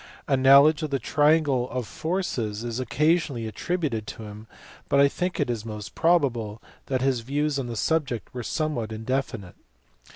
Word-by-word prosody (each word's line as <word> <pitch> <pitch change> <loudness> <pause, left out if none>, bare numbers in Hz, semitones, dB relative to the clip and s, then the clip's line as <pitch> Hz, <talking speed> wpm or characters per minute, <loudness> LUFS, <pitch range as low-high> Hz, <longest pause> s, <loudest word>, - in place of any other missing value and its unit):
A 140 - +3
knowledge 140 +4 +6
of 155 - -2
the 140 - 0
triangle 145 -1 +2
of 125 -1 -3
forces 130 - -3
is 120 0 -3
occasionally 145 -1 +1
attributed 120 -2 -2
to 110 - -7
him, 105 +1 -10 0.4
but 140 - +3
I 140 - +7
think 180 +5 -3
it 145 - +1
is 115 -3 -3
most 105 -3 -7
probable 125 -11 +1 0.3
that 130 -1 -1
his 135 -2 +2
views 140 +4 -1
on 130 - -3
the 120 - -5
subject 135 -2 -1
were 125 - -4
some 155 +5 -2
what 115 -4 -4
indefinite. 110 -4 -3
130 Hz, 170 wpm, -25 LUFS, 115-150 Hz, 0.4 s, I